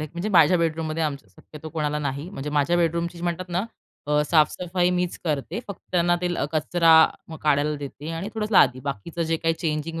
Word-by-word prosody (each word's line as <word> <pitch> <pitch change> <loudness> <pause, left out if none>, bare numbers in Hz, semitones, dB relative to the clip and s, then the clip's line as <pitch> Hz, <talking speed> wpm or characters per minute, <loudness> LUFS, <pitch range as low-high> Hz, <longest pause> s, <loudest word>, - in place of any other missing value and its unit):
आहे 155 - -4
म्हणजे 175 +5 -3
माझ्या 175 -2 +5
बेडरूममध्ये 160 -1 -1 0.2
शक्यतो 150 - -12
कोणाला 150 -2 -2
नाही 140 +3 -4
म्हणजे 150 -5 -5
माझ्या 150 +4 +2
बेडरूमची 170 0 -1
म्हणतात 175 +1 -3
ना 180 +4 -1 0.4
अ, 150 0 +2
साफ-सफाई 175 +3 +2
मीच 180 -1 -1
करते. 155 - -2
फक्त 200 - -7
त्यांना 175 0 +3
ते 180 - 0 0.2
कचरा 165 +1 +3 0.5
काढायला 150 0 +2
देते 145 +2 -7
आणि 165 +5 -4
थोडंसं 215 0 -3
लादी. 130 -8 +5
बाकीचं 140 - -4
जे 165 0 0
काही 165 0 0
चेंजिंग 160 0 -3
165 Hz, 175 wpm, -24 LUFS, 150-175 Hz, 0.5 s, माझ्या